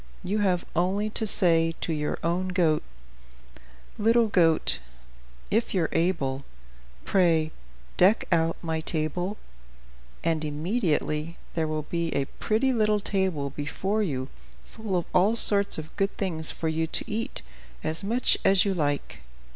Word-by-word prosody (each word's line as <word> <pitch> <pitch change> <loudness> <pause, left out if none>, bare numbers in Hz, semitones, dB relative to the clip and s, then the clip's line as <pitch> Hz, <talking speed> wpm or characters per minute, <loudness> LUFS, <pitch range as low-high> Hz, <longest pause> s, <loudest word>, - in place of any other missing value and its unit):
You 205 +4 -1
have 185 -4 +1
only 195 +5 0
to 220 0 -1
say 165 -4 +3
to 165 - -1
your 150 -1 -2
own 175 +3 0
goat: 175 -5 +2 1.2
"'Little 230 +1 +3
goat, 165 - +3 0.7
if 225 0 0
you're 170 -4 +1
able, 145 -6 0 0.6
Pray 165 -4 +2 0.5
deck 195 +5 +4
out 165 -1 +2
my 160 -1 -2
table,' 175 +6 -2 0.9
and 165 -2 0
immediately 155 -1 -1 0.2
there 160 -1 -1
will 155 0 -2
be 170 +2 -2
a 140 - +1
pretty 230 - 0
little 215 -2 +2
table 190 -9 -1
before 190 +9 -2
you 135 -9 -2 0.4
full 215 -5 -4
of 175 - -2
all 200 +5 +4
sorts 200 -3 +5
of 155 0 -8
good 195 0 -1
things 165 -5 0
for 165 - -3
you 160 0 0
to - - -1
eat, 225 +2 -4 0.4
as 160 +4 -2
much 235 +5 +2
as 195 0 +5
you 200 - +1
like. 145 -5 -2
175 Hz, 140 wpm, -26 LUFS, 155-200 Hz, 1.2 s, sorts